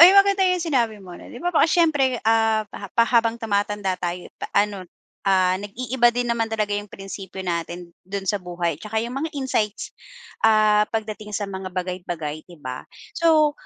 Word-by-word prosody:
uy 340 +2 +12
maganda 395 0 +5
yung 365 -1 +1
sinabi 240 -9 +1
mo 180 -2 -11
na - - -11
di - - -10
ba 355 0 0
baka 320 - +4
siyempre, 295 -7 +3
ah, 225 -1 +3
pa 200 - -7
pa 230 - +3
habang 230 -1 +2
tumatanda 205 -3 -1
tayo 175 0 -4 0.2
ano, 200 -3 +1 0.4
ah, 185 -1 +3
nag-iiba 240 +4 +1
din 240 0 0
naman 225 -1 0
talaga 215 -2 -1
yung 205 0 -2
prinsipyo 195 -1 -8
natin 170 0 -4
dun 195 +1 -5
sa 200 +1 0
buhay. 175 -3 -3
Tsaka 215 +4 -6
yung 240 - -5
mga 275 +5 -2
insights, 220 -6 -1 0.5
ah, 215 -1 +4
pagdating 215 -1 -4
sa 205 - -2
mga 190 -1 -5
bagay-bagay, 175 -4 -4
di 175 - -13
ba? 130 -4 -6 0.3
So, 315 -3 +4
210 Hz, 175 wpm, -23 LUFS, 185-240 Hz, 0.5 s, uy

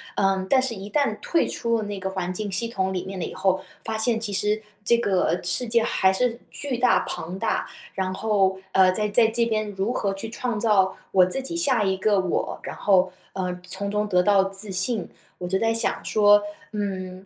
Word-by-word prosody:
呃， 195 -1 +1
但 265 - +5
是 260 -3 -3
一 200 +1 -8
旦 275 -8 +1
退 335 - +1
出 230 0 -1
了 - - -2
那 205 -1 -5
个 190 0 -3
环 185 -1 -3
境 205 +1 -4
系 230 +5 -1
统 190 -4 -2
里 180 - -2
面 190 -1 -6
了 170 - -2
以 - - -7
后， 190 -1 +1 0.2
发 220 - -3
现 225 +1 +1
其 220 -2 -4
实 210 +2 0 0.2
这 235 - +5
个 185 -5 +1
世 205 +8 -1
界 230 0 +2
还 190 -3 +2
是 235 +3 0
巨 275 -4 -4
大 250 +1 +4
庞 180 +4 -5
大。 225 - -1 0.3
然 185 -1 -1
后， 195 -2 +1
呃， 185 -1 +5
在 210 +1 0
在 225 +2 +4
这 230 +1 +1
边， 215 -2 -1
如 195 +3 -1
何 200 -5 -1
去 205 +3 -6
创 235 0 -3
造 195 -4 +3 0.2
我 185 -1 +6
自 185 +9 -1
己 270 +6 -7
下 265 -10 +2
一 190 -1 +1
个 205 +1 +2
我， 185 -2 -2
然 - - -5
后， 190 -2 +3 0.2
呃， 180 -1 -3
从 200 +3 -1
中 210 0 0
得 180 -3 +3
到 200 -1 +4
自 195 +1 -3
信。 190 +2 -1 0.3
我 180 - -4
就 190 +2 +1
在 225 +2 +1
想 225 - -1
说， 205 -1 +5 0.3
嗯， 190 -3 -4
200 Hz, 235 characters per minute, -24 LUFS, 190-225 Hz, 0.3 s, 我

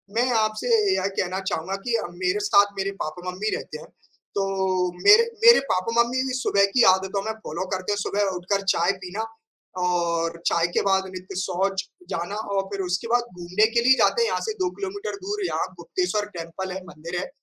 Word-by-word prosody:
मैं 245 +2 +2
आपसे 215 - 0 0.3
यह - - 0
कहना 185 +1 -1
चाहूँगा 175 +5 -2
कि 240 - -1
अ, 225 - -1
मेरे 180 +3 -1
साथ 205 0 +4
मेरे 195 0 -1
पापा-मम्मी 180 +6 -4
रहते - - -7
हैं। - - -12 0.5
तो 200 - +1 0.6
मेरे 440 +3 +8 0.2
मेरे 470 +1 +9
पापा-मम्मी 235 +6 +1
भी 255 - -3
सुबह 200 -5 +3
की 250 - +5
आदतों 190 +1 -2
में 220 - -1
फ़ॉलो 170 +5 -3
करते 185 +2 -2
हैं 205 - 0
सुबह 200 0 0
उठकर 195 +3 -1
चाय 170 +3 +2
पीना 195 +5 -4 0.6
और 170 -1 0
चाय 170 0 +2
के - - +4
बाद 190 0 +2
नित्य 185 0 -8
शौच 190 +1 -1 0.3
जाना 175 +5 -3 0.2
और 195 - +3
फिर 195 - -2
उसके 180 +5 -2
बाद 240 0 +3
घूमने 180 +4 +2
के 235 - +5
लिए 260 - +8
जाते 470 - +3
हैं 465 - +3
यहाँ - - -1
से - - -1
2 370 - +1
किलोमीटर 400 0 -4
दूर 410 -1 -2
यहाँ - - -1
गुप्तेश्वर 360 - -1
टेम्पल 170 +3 -5
है 190 - -5
मंदिर 170 +3 -5
है। 190 - -5
195 Hz, 195 wpm, -24 LUFS, 180-230 Hz, 0.6 s, मेरे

